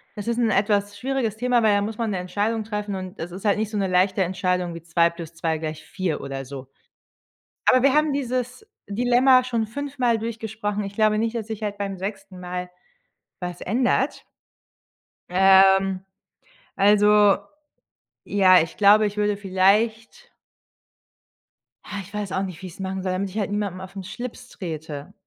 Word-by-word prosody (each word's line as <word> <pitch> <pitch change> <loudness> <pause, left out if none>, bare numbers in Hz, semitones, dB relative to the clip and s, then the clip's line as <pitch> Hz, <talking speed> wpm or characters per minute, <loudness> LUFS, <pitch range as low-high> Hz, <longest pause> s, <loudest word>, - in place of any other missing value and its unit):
das 205 0 -7
ist 235 0 0
'n 235 -2 +2
etwas 205 0 +1
schwieriges 250 -3 -2
Thema, 245 0 +2
weil 210 -2 +4
da 205 - +2
muss 215 +1 -4
man 230 -2 -1
'ne 195 - -1
Entscheidung 205 +5 -1
treffen. 210 -2 -4
Und 185 +1 -7
das 170 +2 -5
ist 185 +4 -9
halt 205 0 +3
nicht 215 0 -1
so 210 - -3
'ne 195 -1 0
leichte 185 +1 +2
Entscheidung 180 -1 -1
wie 165 - -8
2 170 0 +2
plus 170 -1 -9
2 165 -1 -1
gleich 155 -1 -5
4 185 -6 -3
oder 135 0 -5
so. 135 0 -9 1.0
Aber 255 - +6
wir 275 +1 +4
haben 300 -1 +3
dieses 255 - -3 0.2
Dilemma 245 +4 +4
schon 235 -3 -1
fünfmal 250 -1 -1
durchgesprochen. 220 -2 -4
Ich 195 0 -6
glaube 215 0 +2
nicht, 225 +2 -1
dass 220 -2 -4
sich 220 -1 -6
halt 205 -1 -3
beim 195 -1 -3
6. 195 -1 -6
Mal 180 0 -5 0.7
was 180 0 -5
ändert. 255 +6 0 1.0
Ähm, 190 0 +5 0.8
also 205 0 +5 0.9
ja, 185 -3 +5
ich 160 - -5
glaube, 210 +1 +6
ich 205 0 -7
würde 210 0 +1
vielleicht 215 - +1 1.5
Ha, 205 - -6
ich 195 +2 -14
weiß 205 -2 -4
auch 190 - 0
nicht, 185 -4 -7
wie 190 - -6
ich's 175 - -13
machen 190 0 -3
soll, 185 - -1
damit 195 +1 -2
ich 195 - -8
halt 205 -2 -1
niemandem 200 -3 -2
auf 190 +1 -10
’n 195 - -6
Schlips 245 +5 -8
trete. 160 -1 -7
205 Hz, 175 wpm, -23 LUFS, 185-225 Hz, 1.5 s, Aber